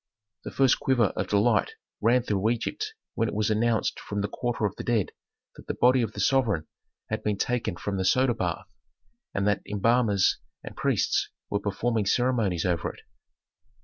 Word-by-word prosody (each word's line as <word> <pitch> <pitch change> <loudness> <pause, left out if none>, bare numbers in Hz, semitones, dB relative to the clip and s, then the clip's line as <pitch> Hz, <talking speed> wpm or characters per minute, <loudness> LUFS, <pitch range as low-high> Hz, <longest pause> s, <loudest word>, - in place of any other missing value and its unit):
The - - -3
first 135 -2 +3
quiver 120 -6 +2
of - - -2
delight 105 +1 +2 0.3
ran 120 +3 +3
through 105 -2 0
Egypt 425 - -3 0.2
when 115 - 0
it - - -4
was 105 0 +1
announced 110 +1 +1
from 100 0 -4
the 100 - -1
quarter 120 0 -2
of 100 - -2
the - - -6
dead 115 -5 0 0.4
that - - -14
the - - -2
body 125 +1 +4
of 110 -2 -2
the - - -7
sovereign 110 - +2 0.5
had 110 0 -1
been 105 -2 -1
taken 115 -3 -1
from 100 +2 -3
the 95 - 0
soda 130 +4 +3
bath, 90 -6 -3 0.7
and 100 0 +1
that 105 - +1
embalmers 105 -1 +2 0.2
and - - -9
priests - - +1 0.2
were 100 - +1
performing 105 +1 -1
ceremonies 115 -8 +1
over 85 -3 0
it. - - -17
110 Hz, 180 wpm, -27 LUFS, 100-120 Hz, 0.7 s, body